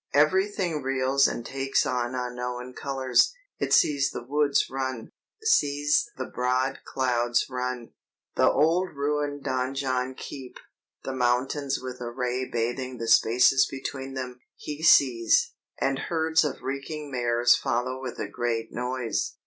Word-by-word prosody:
"Everything 180 +1 +2
reels 135 +1 +2
and 120 - -4
takes 135 +3 0
on 125 -2 -1
unknown 125 0 -4
colors; 135 - +1 0.2
he - - -2
sees 140 -2 +3
the 120 - -6
woods 145 +2 +1
run, 130 -3 -4 0.3
sees 145 - +2
the - - -3
broad 130 +2 -1
clouds 120 -2 0
run, 125 -1 -4 0.4
the - - +4
old 165 +4 +2
ruined 145 0 -2
donjon 130 -1 -1
keep, 130 -2 -9 0.5
the 135 - -4
mountains 130 +3 0
with 130 -1 -7
a 120 - -4
ray 125 +1 -2
bathing 120 +2 -2
the 115 0 -4
spaces 125 +4 +5
between 135 0 -6
them; 125 -1 -5 0.2
he 150 +1 -7
sees; 125 -8 +4 0.3
and 135 0 0
herds 160 +1 +1
of 145 -3 -4
reeking 140 +2 -5
mares 120 -1 +3
follow 125 +2 -2
with 130 -2 -6
a - - -3
great 115 -2 -2
noise! 125 -1 -2
130 Hz, 135 wpm, -26 LUFS, 125-140 Hz, 0.5 s, spaces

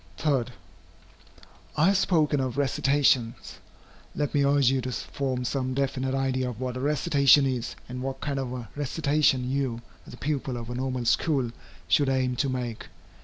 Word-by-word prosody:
3. 140 -6 +1 1.3
I 150 - +4
have 200 - +3
spoken 155 -6 +2
of 130 -1 -2
recitations. 140 -4 +1 0.6
Let 145 -1 -1
me 145 - +3
urge 140 -2 +4
you 135 -1 +1
to 130 +1 -4
form 125 +2 -3
some 130 0 -2
definite 135 -1 -1
idea 130 -1 0
of 120 -2 -8
what 130 -1 -3
a - - -4
recitation 140 0 +4
is, 125 -3 -2
and 125 0 -6
what 135 0 -4
kind 140 -2 -2
of 130 -2 -3
a 125 -2 -6
recitation 145 -2 +1
you, 130 -3 -2 0.2
as - - -11
a - - -15
pupil 135 -3 -2
of 120 0 -6
a - - -3
Normal 130 -1 -2
School, 130 -1 +1 0.4
should 135 +11 +3
aim 130 -1 +1
to 140 +1 +1
make. 125 -3 -4
130 Hz, 170 wpm, -27 LUFS, 125-140 Hz, 1.3 s, I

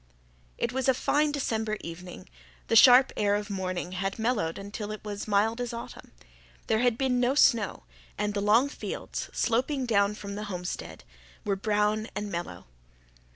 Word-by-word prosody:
It 235 - -2
was 265 0 0
a 260 - +4
fine 295 +4 +1
December 220 -6 -1
evening; 170 - -9 0.4
the - - +2
sharp 250 +3 +8
air 205 -1 +2
of 205 0 -3
morning 185 -2 -3
had 195 +1 -3
mellowed 220 -8 0
until 205 +1 -6
it 215 - -7
was 205 -1 -5
as - - -6
mild 215 +3 +1
as 240 -1 -3
autumn. 235 - -9 0.5
There 220 - +1
had 245 -1 +2
been 255 -2 +1
no 250 +2 +2
snow, 230 - +3 0.3
and 210 0 -1
the 200 - -1
long 220 +6 +4
fields, 280 - -6
sloping 255 +3 0
down 205 -3 +2
from 200 -1 -7
the 210 +1 -5
homestead, 180 -3 -6 0.4
were 200 - +1
brown 210 +2 0
and 210 -1 -4
mellow. 170 - -5
215 Hz, 170 wpm, -28 LUFS, 200-245 Hz, 0.5 s, sharp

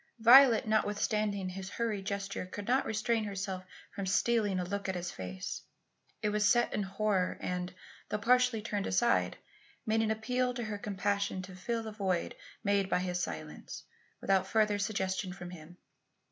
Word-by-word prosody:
Violet, 235 0 +8
notwithstanding 210 -2 +1
his 190 +1 -6
hurried 210 -3 -2
gesture, 200 -2 -3
could 200 +2 -7
not 260 +3 +2
restrain 220 +1 0
herself 195 -2 -4 0.3
from 200 -1 -4
stealing 210 0 +2
a - - 0
look 200 +2 -3
at 190 - -1
his 175 0 -3
face. 95 0 -5 0.6
It 210 - +2
was 210 0 +3
set 240 -1 +3
in 210 - 0
horror 195 -1 0
and, 180 0 -3 0.4
though 210 - 0
partially 250 0 +3
turned 205 -3 -2
aside, 90 -1 +2 0.5
made 220 +1 +2
an 220 - +1
appeal 250 +3 0
to 240 - -3
her 210 -2 -4
compassion 200 -1 -1
to 185 0 -9
fill 230 +5 -2
the 220 - -5
void 190 -5 -1 0.3
made 200 -1 +2
by - - +3
his 180 -1 -1
silence, 80 -2 -6 0.4
without 190 -1 +2
further 210 -1 +2
suggestion 190 -3 -1
from 180 -2 -8
him. 175 0 -11
200 Hz, 165 wpm, -32 LUFS, 185-220 Hz, 0.6 s, Violet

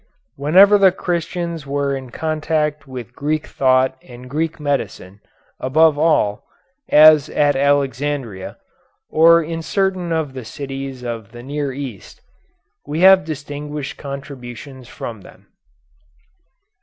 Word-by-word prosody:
Whenever 190 +9 +5
the 190 -1 +6
Christians 170 -3 -3
were 140 0 -1
in 130 -2 -7
contact 155 0 -2
with 125 -2 -8
Greek 150 +2 -2
thought 130 0 +2
and 125 0 -13
Greek 155 +4 -3
medicine, 140 -9 -3 0.4
above 155 +4 +3
all, 145 -10 +1 0.5
as 155 -1 +7
at 145 -1 +2
Alexandria, 140 -6 -1 0.5
or 165 +1 +6
in 165 +1 -5
certain 185 -1 -1
of 160 -4 -1
the 130 -2 -7
cities 135 +2 -7
of 115 -3 -6
the 120 0 -10
near 145 +1 -3
East, 130 -7 -8 0.7
we 150 +3 -2
have 190 -1 +7
distinguished 145 -1 -6
contributions 135 -2 -9
from 115 -4 -8
them. - - -17
145 Hz, 120 wpm, -19 LUFS, 130-155 Hz, 0.7 s, as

